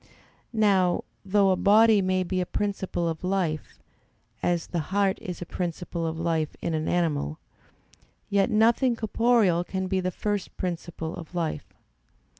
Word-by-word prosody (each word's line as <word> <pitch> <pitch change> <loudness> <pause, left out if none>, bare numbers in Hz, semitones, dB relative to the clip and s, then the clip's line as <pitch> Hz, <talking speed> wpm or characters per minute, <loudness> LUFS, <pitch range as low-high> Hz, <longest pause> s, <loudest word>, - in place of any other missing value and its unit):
Now, 200 -5 +3 0.2
though 200 0 +3
a - - +3
body 215 +2 +5
may 185 0 +1
be 185 +1 -1
a - - -1
principle 195 -4 -2
of 160 0 -4
life, 180 -5 -1 0.6
as 175 -2 0
the 175 - -3
heart 195 0 +1
is 180 -1 -5
a - - -10
principle 170 -1 -3
of 160 0 -3
life 165 -2 -1
in 170 - -2
an 155 0 -1
animal, 150 - 0 0.9
yet 200 +1 +2
nothing 235 +3 +3
corporeal 220 -5 +2
can 190 +2 -3
be 190 0 0
the 185 0 -1
first 205 +1 -3
principle 170 -2 -4
of 170 +1 -10
life. 160 -4 -2
185 Hz, 150 wpm, -26 LUFS, 170-200 Hz, 0.9 s, body